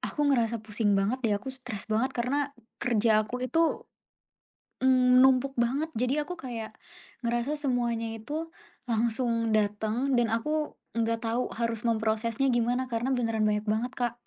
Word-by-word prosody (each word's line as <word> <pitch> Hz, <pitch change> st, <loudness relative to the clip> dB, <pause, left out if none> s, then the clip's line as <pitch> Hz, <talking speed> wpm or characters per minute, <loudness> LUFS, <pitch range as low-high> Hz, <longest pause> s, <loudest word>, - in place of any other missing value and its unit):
aku 295 Hz, -, -4 dB
ngerasa 235 Hz, -2 st, +2 dB
pusing 210 Hz, -1 st, +1 dB
banget 200 Hz, +6 st, +1 dB
deh. 210 Hz, -2 st, +3 dB
Aku 265 Hz, +6 st, -6 dB
stress 250 Hz, -6 st, -6 dB
banget 250 Hz, +5 st, +2 dB
karena 275 Hz, +4 st, 0 dB, 0.3 s
kerja 220 Hz, -2 st, +3 dB
aku 250 Hz, +4 st, -3 dB
itu, 325 Hz, +6 st, +1 dB, 1.0 s
mmm, 255 Hz, -1 st, +5 dB
numpuk 265 Hz, +1 st, +4 dB
banget. 275 Hz, +7 st, 0 dB
Jadi 250 Hz, +2 st, +1 dB
aku 360 Hz, -, -6 dB
kayak 235 Hz, -6 st, -5 dB, 0.5 s
ngerasa 240 Hz, +6 st, -1 dB
semuanya 240 Hz, -4 st, 0 dB
itu 295 Hz, +9 st, -5 dB, 0.4 s
langsung 230 Hz, 0 st, 0 dB
datang 215 Hz, +5 st, +1 dB
dan 240 Hz, -2 st, +2 dB
aku 300 Hz, +7 st, -1 dB, 0.2 s
nggak 230 Hz, 0 st, +1 dB
tahu 235 Hz, +2 st, 0 dB
harus 230 Hz, 0 st, -1 dB
memprosesnya 225 Hz, +3 st, +1 dB
gimana 245 Hz, +2 st, +1 dB
karena 235 Hz, +3 st, 0 dB
beneran 225 Hz, -3 st, 0 dB
banyak 210 Hz, 0 st, +1 dB
banget, 225 Hz, +4 st, 0 dB
Kak. 240 Hz, -2 st, -1 dB
235 Hz, 145 wpm, -28 LUFS, 225-260 Hz, 1.0 s, mmm